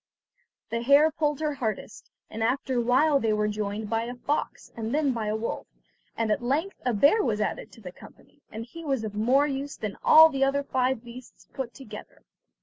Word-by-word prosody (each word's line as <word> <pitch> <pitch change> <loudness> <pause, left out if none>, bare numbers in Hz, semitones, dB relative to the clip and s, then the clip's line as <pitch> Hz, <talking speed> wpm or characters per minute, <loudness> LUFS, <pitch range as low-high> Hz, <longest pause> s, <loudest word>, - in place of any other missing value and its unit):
The 230 0 -1
hare 285 +5 +5
pulled 300 -1 -1
her 305 -1 0
hardest, 220 -6 -5 0.2
and 225 - -7
after 255 +1 0
a - - +2
while 275 +5 +3
they 225 -4 +1
were 210 0 +1
joined 210 0 -3
by 225 +1 -1
a 245 +1 -6
fox, 290 +4 -3
and 225 +3 -3
then 295 -3 +1
by 225 -3 -3
a 210 - 0
wolf, 220 +1 -4 0.5
and 225 -2 0
at 210 - 0
length 295 +11 -2
a 250 - +1
bear 285 - +4
was 220 -5 0
added 210 - -3
to 225 - -15
the 180 -3 -8
company, 290 - -17
and 225 +1 -6
he 330 +7 -11
was 270 -6 -1
of 215 -2 -5
more 250 +7 +3
use 280 0 -4
than 210 -2 -5
all 320 +1 +8
the 270 -3 0
other 275 +1 +1
five 255 -3 0
beasts 240 +1 -13
put 260 -3 -5
together. 270 - -11
250 Hz, 210 wpm, -26 LUFS, 220-280 Hz, 0.5 s, all